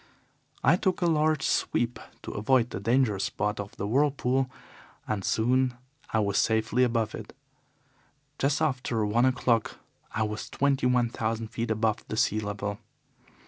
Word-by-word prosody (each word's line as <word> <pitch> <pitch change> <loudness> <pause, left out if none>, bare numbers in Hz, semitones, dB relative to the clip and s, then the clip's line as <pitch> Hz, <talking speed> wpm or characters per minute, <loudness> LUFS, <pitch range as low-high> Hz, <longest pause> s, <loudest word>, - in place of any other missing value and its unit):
I 175 - +5
took 185 -1 0
a - - +3
large 155 -3 +2
sweep 120 0 0 0.2
to - - -6
avoid 125 +2 +2
the - - -4
danger 115 -1 +2
spot 105 +2 -1
of 100 0 -6
the 100 - -3
whirlpool, 135 +1 +1 0.6
and 105 -3 -2
soon 125 +4 +2 0.4
I - - +1
was 100 -1 +1
safely 110 +2 +2
above 115 -3 +1
it. 110 +2 -8 1.0
Just 140 +3 +1
after 125 -6 0
one 115 +4 +2
o'clock 120 -3 +1 0.3
I 110 - 0
was 105 0 -4
twenty 140 -2 +1
one 125 -1 +2
thousand 115 -1 -3
feet 115 0 -3
above 110 0 0
the 110 - -4
sea 110 - +2
level. 105 -1 -4
115 Hz, 150 wpm, -28 LUFS, 110-130 Hz, 1.0 s, I